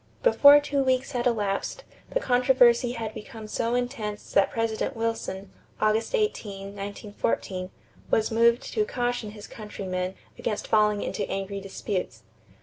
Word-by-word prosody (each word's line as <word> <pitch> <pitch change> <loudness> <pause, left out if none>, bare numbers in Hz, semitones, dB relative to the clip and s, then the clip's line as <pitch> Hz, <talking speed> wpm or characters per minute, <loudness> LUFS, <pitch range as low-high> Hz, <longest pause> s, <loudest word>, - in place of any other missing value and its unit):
Before 290 -12 +8
two 285 -1 0
weeks 260 0 +1
had 245 -2 0
elapsed 210 - -1 0.3
the - - 0
controversy 245 - +4
had 225 -3 -4
become 215 +1 -9
so 230 +2 -1
intense 240 -4 -3
that 195 - +4
President 225 +3 -1
Wilson 225 -4 -3 0.3
(August 215 - +1
18, 205 - -2
1914) 200 -2 -3 0.4
was 220 0 +2
moved 235 +2 +4
to 430 - +2
caution 245 - -2
his 210 0 -10
countrymen 185 -4 -5 0.2
against 210 - -2
falling 210 -1 +3
into - - -3
angry 195 0 -3
disputes. 195 -1 -4
220 Hz, 135 wpm, -26 LUFS, 205-245 Hz, 0.4 s, Before